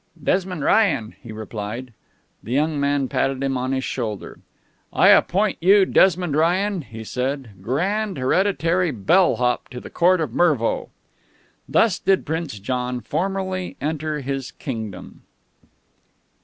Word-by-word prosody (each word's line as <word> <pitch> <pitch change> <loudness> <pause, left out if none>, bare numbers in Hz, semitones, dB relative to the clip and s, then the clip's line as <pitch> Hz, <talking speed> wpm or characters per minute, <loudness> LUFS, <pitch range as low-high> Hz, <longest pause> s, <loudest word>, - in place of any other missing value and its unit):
"Desmond 185 -3 0
Ryan," 145 - +2
he 120 - -10
replied. 110 +3 -6 0.5
The 115 - -9
young 150 +3 +1
man 140 -1 +1
patted 135 +1 -1
him 135 -1 0
on 130 +1 -2
his 130 -1 -1
shoulder. 110 -8 -4 0.5
"I - - +5
appoint 200 +2 +3
you, 195 +3 +6
Desmond 180 -6 +3
Ryan," 180 +4 +1
he 115 -4 -9
said, 130 +1 -3
"Grand 190 - -1
Hereditary 180 +4 +1
Bell 150 - +3
Hop 125 0 -1
to 125 -1 -7
the - - -11
Court 180 +1 +3
of 150 -8 -2
Mervo." 145 -9 +1 0.8
Thus 210 -5 +3
did 195 -1 +2
Prince 160 -6 -3
John 125 +4 -3
formally 185 +3 -3
enter 155 0 -2
into 140 - -7
his 135 -1 -3
kingdom. 110 -8 -7
145 Hz, 135 wpm, -22 LUFS, 125-185 Hz, 0.8 s, you